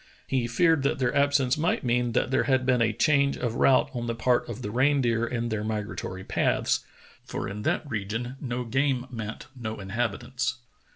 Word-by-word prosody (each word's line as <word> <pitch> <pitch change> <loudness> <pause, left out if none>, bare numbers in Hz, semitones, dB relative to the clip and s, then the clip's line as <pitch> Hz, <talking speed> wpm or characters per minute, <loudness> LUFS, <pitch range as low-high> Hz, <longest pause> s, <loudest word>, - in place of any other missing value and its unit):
He 125 -3 0
feared 160 +5 +3
that 140 - +1
their 125 0 0
absence 140 -1 +3
might 165 0 +1
mean 120 -1 +1
that 130 - +1
there 130 - +2
had 130 -2 +2
been 125 -2 +3
a 115 -1 +3
change 140 +4 +2
of 120 -3 -2
route 130 +2 +4
on 120 -2 -3
the 115 - -1
part 120 +2 +1
of 125 - -6
the 105 - -3
reindeer 125 -2 +2
in 120 -1 -2
their 110 -2 -2
migratory 105 -3 -4
paths, - - +1 0.4
for - - -4
in 105 +1 -5
that 145 - 0
region 115 +2 -3
no 125 -2 -2
game 135 +1 +1
meant 110 0 -6
no 110 -3 -5
inhabitants. 120 +5 -2
120 Hz, 185 wpm, -27 LUFS, 115-135 Hz, 0.4 s, route